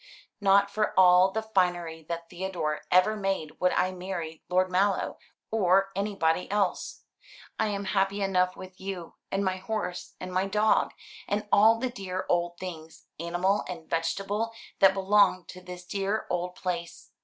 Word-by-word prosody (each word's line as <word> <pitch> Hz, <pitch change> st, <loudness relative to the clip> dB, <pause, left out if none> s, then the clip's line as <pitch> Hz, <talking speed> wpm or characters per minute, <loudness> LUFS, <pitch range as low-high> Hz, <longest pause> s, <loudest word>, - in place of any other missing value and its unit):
Not 200 Hz, 0 st, +4 dB
for 215 Hz, -1 st, -1 dB
all 180 Hz, 0 st, +7 dB
the 220 Hz, +3 st, -3 dB
finery 175 Hz, -6 st, 0 dB
that 170 Hz, 0 st, -4 dB
Theodore 175 Hz, -4 st, -3 dB
ever 185 Hz, +4 st, +4 dB
made 195 Hz, -6 st, -3 dB
would 180 Hz, 0 st, +3 dB
I 185 Hz, -, +2 dB
marry 180 Hz, -3 st, -5 dB
Lord 185 Hz, +1 st, +2 dB
Mallow, 195 Hz, +1 st, +1 dB, 0.3 s
or 195 Hz, -2 st, +3 dB
anybody 195 Hz, -4 st, 0 dB
else. 200 Hz, -2 st, -1 dB, 0.6 s
I -, -, +2 dB
am 200 Hz, -1 st, -3 dB
happy 195 Hz, +1 st, +1 dB
enough 185 Hz, -1 st, +1 dB
with 185 Hz, 0 st, -11 dB
you, 190 Hz, -3 st, -6 dB, 0.2 s
and 195 Hz, +1 st, 0 dB
my 185 Hz, 0 st, 0 dB
horse, 190 Hz, -2 st, -4 dB
and 185 Hz, 0 st, -6 dB
my 185 Hz, +1 st, +1 dB
dog, 210 Hz, +2 st, +2 dB, 0.3 s
and 210 Hz, +1 st, -1 dB
all 220 Hz, +2 st, +6 dB
the 250 Hz, +1 st, -2 dB
dear 185 Hz, -5 st, -4 dB
old 175 Hz, 0 st, +1 dB
things, 165 Hz, -3 st, -8 dB
animal 175 Hz, +4 st, 0 dB
and 165 Hz, -3 st, -7 dB
vegetable, 195 Hz, +7 st, -1 dB, 0.3 s
that 195 Hz, -1 st, +6 dB
belong 195 Hz, -1 st, +3 dB
to 185 Hz, -, -9 dB
this 180 Hz, 0 st, -9 dB
dear 200 Hz, +3 st, -2 dB
old 180 Hz, 0 st, -2 dB
place. 170 Hz, -2 st, -5 dB
185 Hz, 155 wpm, -28 LUFS, 180-200 Hz, 0.6 s, all